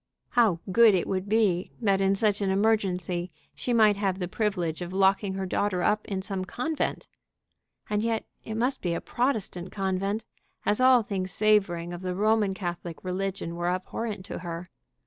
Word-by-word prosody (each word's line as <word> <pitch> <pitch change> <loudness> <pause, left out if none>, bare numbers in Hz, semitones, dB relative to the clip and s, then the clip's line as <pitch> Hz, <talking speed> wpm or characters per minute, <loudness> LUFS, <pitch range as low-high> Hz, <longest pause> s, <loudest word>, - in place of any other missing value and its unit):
How 220 -9 +3
good 225 0 +7
it 180 - +1
would 190 +1 -2
be 200 -5 +2
that 195 -4 +2
in 195 0 +3
such 205 0 +1
an 195 - +1
emergency 190 -4 +1 0.2
she 250 - -3
might 215 -3 +5
have 195 -2 0
the 180 -2 -3
privilege 180 -5 -1
of 175 +1 -5
locking 195 0 +2
her 190 0 -2
daughter 185 -1 0
up 210 0 +1
in 190 -2 -3
some 195 -2 -3
convent! 270 +11 -2 0.8
And 210 0 0
yet 225 0 -1 0.2
it 220 - -5
must 250 +4 0
be 170 -2 -1
a - - -1
Protestant 215 -8 -2
convent, 195 +2 -1 0.4
as 210 +4 +2
all 255 -2 +6
things 190 -3 -3
savoring 190 -5 +2
of 175 - -7
the 185 -1 -3
Roman 210 -1 +2
Catholic 175 -3 -5
religion 185 -2 -3
were 175 0 -1
abhorrent 190 +2 -3
to - - -5
her. 170 0 -6
195 Hz, 175 wpm, -27 LUFS, 180-215 Hz, 0.8 s, good